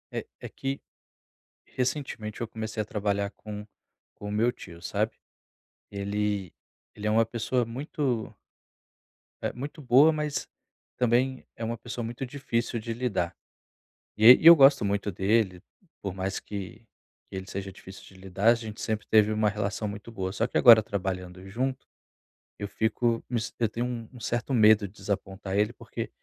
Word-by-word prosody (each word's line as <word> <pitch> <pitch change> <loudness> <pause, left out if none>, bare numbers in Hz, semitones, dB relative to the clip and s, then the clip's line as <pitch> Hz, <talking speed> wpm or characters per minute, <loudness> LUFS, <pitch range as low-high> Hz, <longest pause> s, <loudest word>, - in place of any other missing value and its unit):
É - - -3 0.2
é - - -6
que 135 +1 -4 0.9
recentemente 125 -5 -3
eu 115 - -2
comecei 110 -1 -4
a - - -6
trabalhar 100 -1 -1
com 105 0 -8 0.5
com 105 - -7
o - - -4
meu 110 +3 +3
tio, 85 -7 -12
sabe? - - -1 0.8
Ele 100 -2 -2 0.4
ele 105 0 -4
é - - +2
uma 115 +1 +4
pessoa 120 +2 -1
muito 125 -1 -3 1.1
eh, - - 0
muito 145 +5 -7
boa, 135 +5 +6
mas 150 -1 -2 0.5
também 125 +2 +1
é 115 - -5
uma 115 +1 -3
pessoa 120 +1 -6
muito 120 +3 -5
difícil 120 -3 -2
de 115 +1 -4
lidar. 110 -8 -1 0.8
E 115 +4 +10
eu 170 0 +11
gosto 135 -4 +6
muito 100 0 -1
dele, 95 -1 +1 0.4
por 100 - -3
mais 95 0 -3
que 100 +2 -7 0.4
que - - -13
ele 95 - -5
seja 95 0 -5
difícil 95 0 -12
de - - -16
lidar, 95 +4 +1
a - - +6
gente 110 -2 -7
sempre 110 -1 -2
teve 110 -1 +5
uma 110 0 +2
relação 105 0 -2
muito 105 +3 -8
boa. 95 -3 -3
Só 115 - 0
que - - -7
agora, 115 -3 +9
trabalhando 95 -2 -4
junto, 130 +5 -2 0.7
eu 100 0 -5
fico 115 +1 0
me 120 - 0
sen 110 - -5
eu 115 - +3
tenho 115 +3 -3
um 120 -2 -4
um 125 - -11
certo 120 +4 -2
medo 110 -3 +6
de 95 - -18
desapontar 95 -1 -4
ele, 105 +1 +2
porque - - -6
110 Hz, 165 wpm, -27 LUFS, 100-120 Hz, 1.1 s, eu